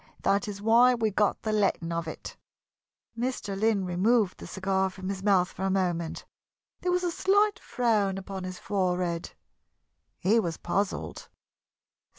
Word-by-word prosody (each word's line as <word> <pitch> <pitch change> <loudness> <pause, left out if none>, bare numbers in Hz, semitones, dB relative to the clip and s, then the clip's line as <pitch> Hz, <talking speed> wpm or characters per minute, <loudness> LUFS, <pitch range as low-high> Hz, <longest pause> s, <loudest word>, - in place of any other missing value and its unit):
That 200 +1 +2
is 205 -1 -6
why 240 +3 +6
we 220 -2 0
got 205 +1 +1
the 220 - -1
letting 195 -5 +1
of 170 0 -2
it." 160 - -7 0.8
Mr. 235 -4 -3
Lynn 205 -1 +1
removed 195 +3 +2
the - - -8
cigar 190 0 0
from 190 0 -7
his 195 -1 -4
mouth 190 -2 +3
for - - -10
a 195 - +1
moment. 175 -4 -1 0.5
There 360 - -1
was 360 0 +1
a 350 - 0
slight 405 +4 +2
frown 210 -6 0
Upon 195 0 -6
his 185 0 -6
forehead. 180 -3 -1 0.8
He 210 +5 +3
was 170 -6 -2
puzzled. 190 +3 -3
195 Hz, 155 wpm, -28 LUFS, 185-225 Hz, 0.8 s, why